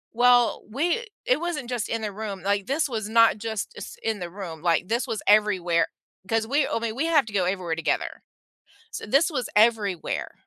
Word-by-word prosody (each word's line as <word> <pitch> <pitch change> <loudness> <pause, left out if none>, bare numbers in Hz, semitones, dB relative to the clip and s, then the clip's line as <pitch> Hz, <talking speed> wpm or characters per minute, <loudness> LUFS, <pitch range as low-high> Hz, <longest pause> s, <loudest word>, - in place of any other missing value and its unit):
Well, 245 0 +4
we 340 - 0 0.2
it 255 +4 +2
wasn't 320 -8 -3
just 240 -4 -2
in 225 0 -2
the 210 -1 -3
room, 200 -2 -6
like, 200 +2 0
this 285 +3 +1
was 220 -4 -4
not 230 -1 +5
just 220 -2 -4
is - - -8
in 220 -3 -1
the 175 -1 -5
room, 170 -4 -8
like, 175 +1 +1
this 235 +2 -1
was 220 - -3
everywhere, 185 -6 +3 0.4
'cause 225 +1 +1
we're 280 +4 +1
I - - 0
mean, 225 -1 -3
we 295 +5 -1
have 300 -6 +4
to 215 - -10
go 185 -3 +2
everywhere 180 -3 -1
together, 165 - -2 0.7
so - - -6
this 275 - +3
was 255 -7 -3
everywhere. 210 -5 +1
220 Hz, 200 wpm, -25 LUFS, 195-245 Hz, 0.7 s, not